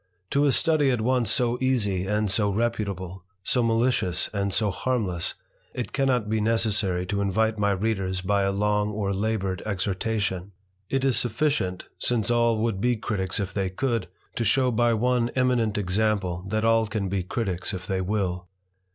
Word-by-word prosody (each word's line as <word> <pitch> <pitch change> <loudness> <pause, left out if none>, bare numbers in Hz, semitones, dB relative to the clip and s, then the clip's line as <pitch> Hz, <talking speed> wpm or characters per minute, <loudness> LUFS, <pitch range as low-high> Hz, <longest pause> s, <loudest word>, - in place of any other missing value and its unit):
To 145 +1 +3
a - - +4
study 150 +1 +3
at 125 -4 +1
once 125 -1 +1
so 120 +2 +2
easy 105 -8 +1
and 105 +1 +1
so 105 0 +1
reputable, 100 -4 -2 0.2
so 125 - +1
malicio 115 -5 +1
and 100 -1 -1
so 105 0 +1
harmless, 95 -6 -1 0.4
it 125 - -4
cannot 130 -5 +1
be 110 0 0
necessary 105 -5 +1
to 100 +2 -1
invite 110 +3 +1
my 100 0 +2
reade 95 -2 -1
by 100 +1 +2
a 100 0 +1
long 105 +1 +1
or 100 -2 -2
laboured 100 -2 -1
exhortation; 100 -1 -2 0.4
it 135 0 0
is 130 -3 +3
sufficient, 120 -8 0
since 120 -2 0
a 120 0 +3
would 110 -3 -1
be 125 +1 +2
Criticks 95 -6 -2
if 95 -2 -3
they 95 -2 -1
could, 115 +1 -1 0.3
to 115 - +1
shew 125 +4 +3
by 120 0 +2
one 120 +1 +1
eminer 125 -5 +1
example 100 -2 0
that 110 +2 0
all 115 -1 +3
can 105 -2 -2
be 95 0 -1
Criticks 90 -1 -3
if 90 -3 -6
they 95 0 -1
will. 90 -2 -2
105 Hz, 170 wpm, -25 LUFS, 95-115 Hz, 0.4 s, a